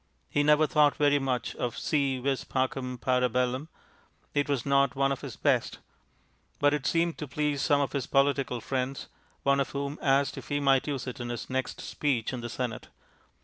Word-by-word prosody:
He 145 - +2
never 150 +1 +5
thought 150 -1 +3
very 145 -1 +3
much 130 -2 -2
of 120 -2 -3
Si 140 -3 0
vis 135 +1 -1
pacem, 130 -1 -2
para 125 0 +2
bellum; 125 +5 -1 0.6
it 145 0 0
was 135 -4 0
not 140 -1 +3
one 135 0 +2
of 135 - -3
his - - -7
best; - - +1 0.8
but 145 0 +3
it 140 -2 -1
seemed 170 +1 +1
to 150 - -4
please 145 0 -1
some 145 +2 +3
of 140 - -1
his 140 -4 -2
political 135 -3 +1
friends, 130 +3 -3 0.3
one 140 0 +3
of 140 - 0
whom 140 +1 -3
asked 140 0 +2
if - - -12
he 145 -1 0
might 135 -1 +3
use 140 -3 -2
it 130 +1 -6
in 120 0 -4
his 120 +1 -5
next 130 0 -2
speech 130 -5 -1
in 125 - -4
the 120 - -5
Senate. 120 -2 -4
135 Hz, 195 wpm, -28 LUFS, 125-145 Hz, 0.8 s, never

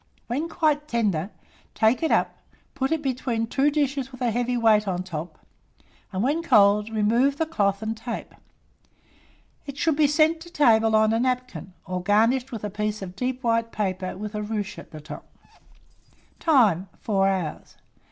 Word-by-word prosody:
When 290 +8 -3
quite 300 -3 0
tender, 205 - 0 0.5
take 225 +2 +3
it 320 - +1
up, - - +1 0.4
put 265 +1 -2
it 320 -1 0
between 250 -4 -1
2 275 +5 +1
dishes 280 -3 -1
with 255 - -12
a 240 -2 +1
heavy 245 +2 -1
weight 215 -3 +3
on 180 -2 -1
the - - -16
top, 165 0 -6 0.7
and 190 +1 -2
when 295 +6 +1
cold, 210 -7 +4
remove 230 +6 +2
the 320 - 0
cloth 200 -9 0
and 220 +1 -2
tape. 230 +1 -6 1.3
It 280 -1 -7
should 320 -1 +1
be 300 0 +4
sent 310 +2 +3
to 345 - -11
table 225 -9 +3
on 215 0 +4
a 225 - +1
napkin, 250 -8 -2
or 185 -1 -3
garnished 230 +7 +2
with 225 -4 -6
a 210 - -2
piece 210 0 -3
of 180 -1 -8
deep 255 +3 -3
white 230 -1 +1
paper 185 -3 -3
with 210 +1 -6
a 210 - -3
ruche 210 -1 -4
at - - -12
the 155 - -10
top. 150 - -10 1.1
Time. 215 - +3
4 195 -3 +1
hours. 185 -5 -3
225 Hz, 175 wpm, -24 LUFS, 205-270 Hz, 1.3 s, cold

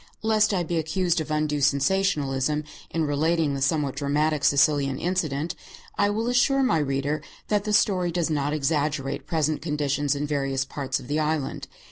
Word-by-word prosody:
Lest 215 -1 +3
I 185 -3 0
be 170 +1 -2
accused 175 +1 0
of 155 - -6
undue 150 -1 0
sensationalism 145 -1 +1 0.3
in 165 -1 -1
relating 155 +1 +1
the 135 - -3
somewhat 140 -1 +1
dramatic 145 +1 0
Sicilian 140 -2 +3
incident, 165 -3 -1 0.4
I 205 0 +2
will 220 +3 -1
assure 265 +2 +3
my 165 -11 +2
reader 140 +1 -1 0.3
that 210 -1 +1
the 210 - -1
story 185 -4 +2
does 170 -1 -1
not 145 -1 0
exaggerate 145 -2 -1
present 155 -2 0
conditions 145 -2 0
in 145 +1 -2
various 135 -2 -1
parts 135 -2 -3
of - - -11
the 150 +3 0
island. 155 -2 -2
150 Hz, 165 wpm, -25 LUFS, 140-170 Hz, 0.4 s, Lest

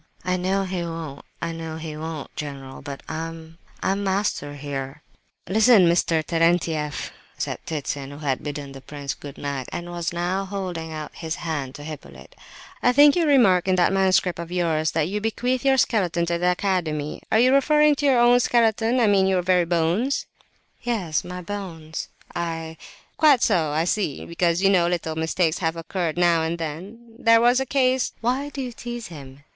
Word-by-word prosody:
"I 180 0 +1
know 190 +2 0
he 185 -2 -3
won't, 165 -4 -6 0.2
I 165 - -1
know 165 -1 -6
he 160 -1 -6
won't, 155 -1 -6
general; 135 -3 -7
but 140 -1 -8
I—I'm 165 +4 -5
master 190 -7 -1
here!" 140 0 -6 0.4
"Listen, 215 -1 +6
Mr. 165 -2 +2
Terentieff," 165 -3 0 0.3
said - - -3
Ptitsin, 145 -3 -3
who 145 - -9
had 140 -4 -2
bidden 145 -1 -6
the 135 0 -10
prince 140 0 -5
good 145 -2 -10
night, 140 -3 -4
and 175 0 -5
was 170 -1 -3
now 180 +3 -1
holding 185 -5 -5
out 155 -1 -6
his 160 -1 -4
hand 145 -6 -4
to 145 - -9
Hippolyte; 155 0 -10 0.5
"I 245 - +4
think 290 +2 +7
you 340 -3 +2
remark 200 -11 +4
in 185 - +3
that 180 +1 +3
manuscript 190 -2 +2
of 170 0 -6
yours, 165 -3 +1
that 160 -1 +1
you 205 +3 -3
bequeath 245 +3 -1
your 270 -1 +4
skeleton 180 -9 +1
to 170 0 -1
the 180 +1 +2
Academy. 175 -6 -1
Are - - +4
you 250 +3 +5
referring 300 +2 +5
to 290 - -1
your 260 -3 +4
own 240 +1 +6
skeleton—I 235 0 +2
mean, 195 -2 +4
your 185 -2 +1
very 180 -1 +3
bones?" 175 +10 0 0.6
"Yes, 200 -11 -1
my 180 0 -7
bones, 165 -5 -6 0.3
I—" 165 -1 -4 0.4
"Quite 295 -6 +5
so, 170 -8 +2
I 155 +2 +1
see; 175 -4 -1
because, 170 +1 0
you 195 - +5
know, 175 -3 +4
little 170 -2 -2
mistakes 160 +1 0
have 160 -2 -1
occurred 165 0 -3
now 170 -2 +4
and 165 +1 -1
then. 200 +9 -7
There 230 -3 +5
was 245 +2 +4
a 265 - -2
case—" 260 -1 +1
"Why 255 +5 0
do 275 -2 -5
you 250 - -5
tease 240 0 -6
him?" 140 -3 -11
175 Hz, 180 wpm, -23 LUFS, 160-210 Hz, 0.6 s, think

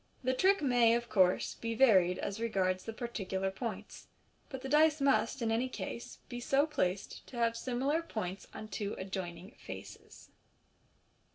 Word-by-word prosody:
The 255 +1 +2
trick 380 +6 +3
may, 240 -3 +5
of 235 0 -2
course, 185 -3 +3
be 230 0 -4
varied 190 -8 +5
as 200 +2 -4
regards 185 -5 0
the 225 - -4
particular 195 -5 -3
points, 210 -1 -6 0.4
but 265 -2 -6
the - - -3
dice 305 +2 +4
must, 275 -2 +2
in 225 - +1
any 240 +3 +1
case, 235 - -6
be 245 -1 -6
so 275 +4 +3
placed 190 -11 -1
as - - -9
to 250 - -9
have 230 -1 +2
similar 265 +6 0
points 200 - -5
on 215 - -8
two 205 0 -3
adjoining 185 0 -5
faces. - - -10
230 Hz, 165 wpm, -33 LUFS, 195-260 Hz, 0.4 s, may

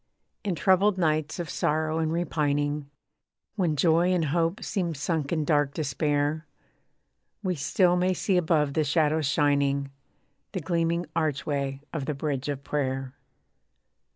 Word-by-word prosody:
In 195 -5 -1
troubled 190 +3 +3
nights 155 -3 0
of 175 -2 -4
sorrow 155 +1 0
and 160 -1 0
repining, 145 -3 -1 0.7
When 175 -7 +1
joy 165 +4 +3
and 175 -3 +2
hope 170 +2 0
seem 175 -5 -2
sunk 145 0 -2
in 155 -3 0
dark 145 -3 +2
despair, 150 +1 0 1.0
We 185 -2 0
still 175 +4 +2
may 180 +1 +1
see 195 - 0
above 155 -5 +2
the 155 - +2
shadows 155 0 +2
shining, 140 -1 +1 0.6
The 190 - -1
gleaming 170 +1 0
archway 140 -3 -1
of 150 -5 -3
the 150 - -1
bridge 140 -1 -2
of 140 -1 -4
prayer. 135 -3 -2
155 Hz, 135 wpm, -27 LUFS, 145-170 Hz, 1.0 s, troubled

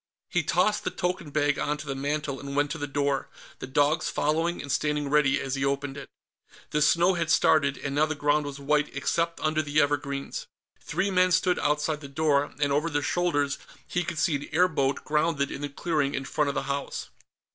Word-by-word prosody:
He 175 - +2
tossed 185 +7 +1
the - - 0
token 180 -3 -3
bag 145 0 +1
onto 150 +1 -2
the 135 - -1
mantel 140 0 -2
and 140 0 -6
went 145 0 +1
to 160 - -4
the 145 - -3
door, 140 -1 -1 0.3
the - - -6
dogs 145 +4 +2
following 165 +4 0
and 140 - -5
standing 150 -1 0
ready 150 -2 +4
as 135 -1 -3
he 135 0 -1
opened 140 0 -1
it. 140 - -9 0.6
The 150 - +1
snow 170 +5 +4
had 170 -2 -1
started, 145 -3 +4
and 140 - -4
now 150 +2 +3
the 155 - -2
ground 145 +1 +1
was 140 0 -7
white 150 +1 +1
except 165 +4 0
under 155 0 +1
the 145 0 0
evergreens. 145 - -1 0.4
Three 200 +1 -1
men 185 -1 +3
stood 180 +1 +2
outside 150 +1 0
the 140 - -8
door, 145 0 +1
and 145 -1 +1
over 150 +4 +1
their 145 -2 -1
shoulders 145 -6 0 0.3
he 180 - -1
could 160 - -5
see 160 -1 +2
an 140 - -9
airboat 155 -5 +1
grounded 150 -2 +1
in 140 - -6
the 145 - -3
clearing 145 -1 -1
in 135 - -3
front 145 +1 0
of 140 - -3
the - - -1
house. 140 0 -4
150 Hz, 210 wpm, -27 LUFS, 140-160 Hz, 0.6 s, ready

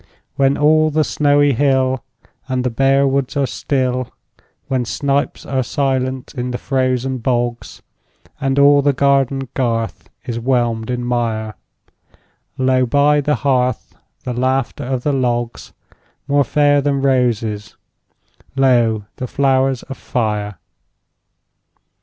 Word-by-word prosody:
When 135 0 +2
all 155 +1 +4
the 155 +1 +1
snowy 145 -1 +2
hill 130 0 +1 0.4
And 130 -2 -1
the 125 - -1
bare 135 +3 +3
woods 135 0 -1
are 140 - +2
still; 130 -1 -2 0.6
When 130 -2 0
snipes 140 +4 -2
are 130 -1 -1
silent 130 0 -2
in 125 -1 -3
the 125 - -3
frozen 130 -1 -1
bogs, 120 0 -2 0.6
And 135 0 -1
all 140 0 +6
the 140 0 +2
garden 135 0 +1
garth 115 -3 -2 0.2
is 115 -1 -3
whelmed 120 -2 0
in 125 -1 -2
mire, 115 -3 -2 1.0
Lo, 130 -1 +2
by 145 +3 +3
the 150 +1 +1
hearth, 125 -3 0 0.3
the 125 - -3
laughter 130 +1 -1
of 130 -1 -2
the 145 - +1
logs— 120 -3 -2 0.6
More 145 0 +3
fair 145 +2 +3
than 140 -1 0
roses, 115 -5 0 0.8
lo, 120 -6 +2
the 125 - -4
flowers 135 -1 +1
of 135 - -8
fire! 105 -4 -2
130 Hz, 125 wpm, -18 LUFS, 120-140 Hz, 1.0 s, all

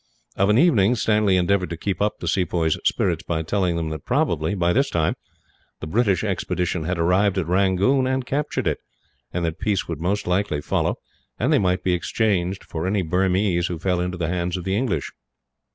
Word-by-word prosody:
Of 100 +1 +2
an 105 - +4
evening, 125 - +4
Stanley 105 -4 +2
endeavoured 90 +1 +1
to 85 - -5
keep 95 +1 -3
up 105 0 0
the 85 - -4
sepoys' 85 -3 0
spirits - - +1
by 80 -1 -2
telling 90 0 0
them 80 -1 -2
that 80 -2 -6
probably, 80 +4 0
by 85 -2 +1
this 135 +4 +2
time, 80 -2 +1 0.7
the - - -6
British 100 0 +1
expedition 90 -2 -2
had 90 +2 -1
arrived 90 +4 +2
at 95 - 0
Rangoon, 95 - +2
and 130 -1 -1
captured 145 +3 -2
it; - - 0 0.5
and 85 -1 -2
that 80 -1 -3
peace 105 -3 0
would 80 -2 -5
most 100 +4 -1
likely 90 -4 0
follow, - - 0 0.4
and - - +1
they - - +4
might 90 -1 0
be 90 - +1
exchanged 95 +2 0
for 80 +2 -4
any 100 0 +1
Burmese 90 +1 +1
who 85 - -4
fell 90 +1 0
into 90 0 -3
the 85 -2 -1
hands 90 0 -1
of 90 - -6
the 95 +2 -1
English. 105 - -1
90 Hz, 200 wpm, -23 LUFS, 85-100 Hz, 0.7 s, an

